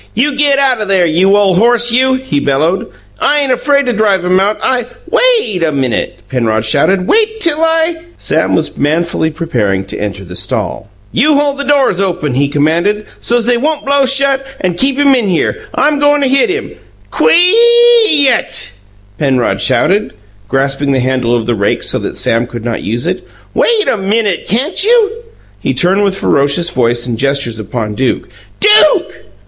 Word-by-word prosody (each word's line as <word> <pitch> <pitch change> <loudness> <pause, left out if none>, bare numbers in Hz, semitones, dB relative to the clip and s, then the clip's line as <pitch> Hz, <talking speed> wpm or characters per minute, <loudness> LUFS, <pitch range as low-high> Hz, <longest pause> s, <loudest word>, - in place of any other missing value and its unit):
"You 275 +6 0
get 285 0 +2
out 265 -4 +1
o' - - -2
there, 190 -3 +2
you 185 +5 +2
ole 200 -2 +2
horse, 240 +4 +3
you!" 260 +2 +2
he 260 - -2
bellowed. 150 +7 -1 0.3
"I 295 0 +1
ain't 275 -2 -1
afraid 280 +3 +1
to 245 - -1
drive 205 -4 0
him 185 +1 +2
out. 205 +2 0
I 250 -2 0
" - - -28
"WAIT 450 - +1
a 160 -2 +1
minute!" 135 -5 -3
Penrod 115 -4 -1
shouted. 185 - +1
"Wait 440 0 +1
till 330 -6 +1
I 325 +1 +1
" 345 - -27
Sam - - 0
was - - -2
manfully 160 +2 0
preparing 120 - -2
to 100 - -7
enter 100 -2 -5
the 90 0 -10
stall. 95 - -3 0.2
"You 305 0 +2
hold 285 -1 0
the - - -2
doors 275 -9 +1
open," 180 -7 -2
he 140 +3 +1
commanded, 170 +9 0
"so's 240 -1 0
they 245 0 +2
won't 300 +4 -2
blow 280 -1 +2
shut 270 0 +2 0.2
and 180 -2 -2
keep 265 +7 0
him 285 -1 +3
in 240 -5 0
here. 180 -3 -2
I'm 295 0 +1
goin' 290 0 +2
to 275 - +1
hit 275 - +2
him 420 +4 -4 0.2
" - - -32
"Quee 470 +4 +4 0.2
YUT!" 240 - 0 0.5
Penrod 130 -4 0
shouted, 205 +3 +1 0.3
grasping 135 +2 -1
the 130 - 0
handle 125 -2 0
of 115 -2 -2
the 120 - 0
rake 100 -2 -1
so - - -1
that - - -6
Sam 115 +1 0
could 120 -2 -8
not 120 -1 -3
use 115 +4 -3
it. 180 +2 -4 0.3
"Wait 450 -3 +1
a - - +1
MINUTE, 200 -1 -1
can't 265 - 0
you?" 450 -1 +3 0.5
He - - -2
turned 190 +3 +2
with 195 -1 0
ferocious 145 +2 +1
voice 120 -1 0
and 120 -2 -4
gestures 135 -5 -1
upon 110 +1 -4
Duke. 130 +5 -2 0.3
"DUKE!" 420 0 +3
200 Hz, 185 wpm, -12 LUFS, -, 0.5 s, Quee